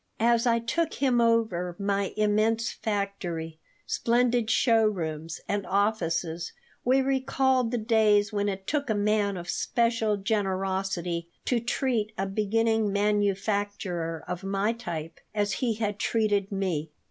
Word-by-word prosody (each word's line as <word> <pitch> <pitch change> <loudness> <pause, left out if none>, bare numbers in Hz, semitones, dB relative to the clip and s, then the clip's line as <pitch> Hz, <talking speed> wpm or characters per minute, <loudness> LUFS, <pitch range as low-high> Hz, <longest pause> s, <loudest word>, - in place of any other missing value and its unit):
As 235 +1 +3
I 230 -1 +4
took 290 +8 -1
him 255 -4 +2
over 220 -7 +1
my 200 -1 0
immense 215 +2 +2
factory, 180 -6 -3 0.3
splendid 240 -1 +1
showrooms, 175 - +1
and 205 0 -1
offices, 175 -5 0 0.3
we 260 +2 +4
recalled 265 -2 +1
the 245 - -1
days 215 -2 +3
when 205 0 0
it 190 -1 -5
took 285 +2 -1
a 220 - +2
man 205 -1 +1
of 175 0 -7
special 230 0 +1
generosity 190 -4 -1 0.2
to 245 - +2
treat 235 -2 -1
a 195 - 0
beginning 220 +2 +1
manufacturer 200 -4 -1
of 180 0 -4
my 195 +3 0
type 170 -9 -6 0.2
as 205 -1 +1
he 235 -4 +1
had 210 -2 -2
treated 205 -3 +1
me. 180 -6 -1
205 Hz, 130 wpm, -27 LUFS, 190-230 Hz, 0.3 s, I